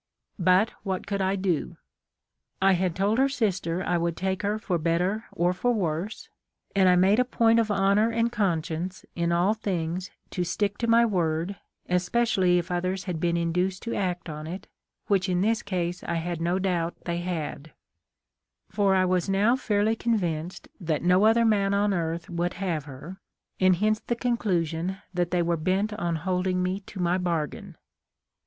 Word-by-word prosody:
But 185 +4 +4
what 190 -2 -3
could 200 -1 -2
I 190 +1 +1
do? 180 - -1 0.8
I 195 0 +4
had 180 -2 0
told 205 +5 +1
her 270 +1 +4
sister 185 -9 -1
I 175 -1 +1
would 170 0 -1
take 190 +1 -1
her 210 +1 0
for 185 -5 -2
better 175 +6 0
or 175 +1 +1
for 245 +7 0
worse; 185 -1 -2 0.5
and 190 -2 +5
I 180 - +5
made 190 +5 +4
a - - +5
point 230 -2 +3
of 225 -1 +1
honor 200 +2 +3
and 230 0 0
conscience 180 -4 -2
in 170 -1 0
all 175 +5 +3
things 185 -4 -3 0.2
to 180 - -1
stick 200 +3 -1
to 235 - -1
my 230 +1 +5
word, 175 -2 -1 0.3
especially 185 0 +2
if 175 0 -2
others 185 +2 -1
had 175 -4 -4
been 170 0 +1
induced 180 +3 -1
to 235 - -3
act 180 -3 -2
on 155 -1 -6
it, 180 +4 -6 0.4
which 195 -2 +1
in 180 0 +1
this 225 +3 +1
case 180 -2 -3
I 170 - -2
had 165 0 -3
no 175 +2 +1
doubt 175 -3 -1
they 170 0 -2
had; 160 -4 -4 1.0
for 200 -2 +2
I 185 -1 +3
was 180 0 0
now 205 +5 +3
fairly 215 -3 +1
convinced 180 -8 -2
that 160 -5 -2
no 180 +3 +4
other 230 +1 +4
man 200 -2 +2
on 205 0 +2
earth 165 -1 -2
would 175 0 -2
have 175 -6 -2
her, 150 +8 -10 0.4
and 185 -1 +5
hence 215 +4 +1
the 240 - -2
conclusion 190 -7 -1 0.2
that 175 -1 0
they 175 -1 +1
were 170 0 0
bent 190 +6 0
on 175 -5 -2
hold 180 +3 -1
ing 180 0 +1
me 185 +2 -1
to 195 - -9
my 180 +1 +1
.bargain. 165 -5 -3
185 Hz, 180 wpm, -26 LUFS, 170-205 Hz, 1.0 s, and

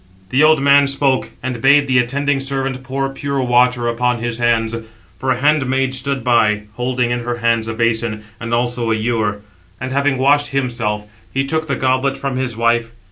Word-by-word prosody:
The 130 - +3
old 155 0 +5
man 140 0 +5
spoke, 135 -1 0
and 125 -3 -4
bade 140 +3 +5
the 130 -1 +3
attending 140 +3 0
servant 135 -1 -2
pour 135 +1 -2
pure 140 0 -3
water 125 0 +2
upon 125 +1 0
his 120 0 -4
hands; 115 -1 +1 0.4
for 130 - -2
a 130 - +2
handmaid 135 -2 +1
stood 135 0 -2
by, 105 -3 +2
holding 125 +1 -1
in 120 - 0
her 120 0 -3
hands 115 -1 +1
a 110 - -4
basin, 115 -2 -1 0.2
and 115 0 -6
also 120 0 0
an 110 - +1
ewer; 110 -2 -1 0.4
and 130 +1 -5
having 140 0 +1
washed 145 +2 +3
himself, 120 -6 -2 0.3
he 135 0 -1
took 160 +3 -2
the 140 - 0
goblet 130 +1 0
from 135 -2 -3
his 125 -3 -3
wife. 115 0 +1
125 Hz, 190 wpm, -18 LUFS, 115-135 Hz, 0.4 s, old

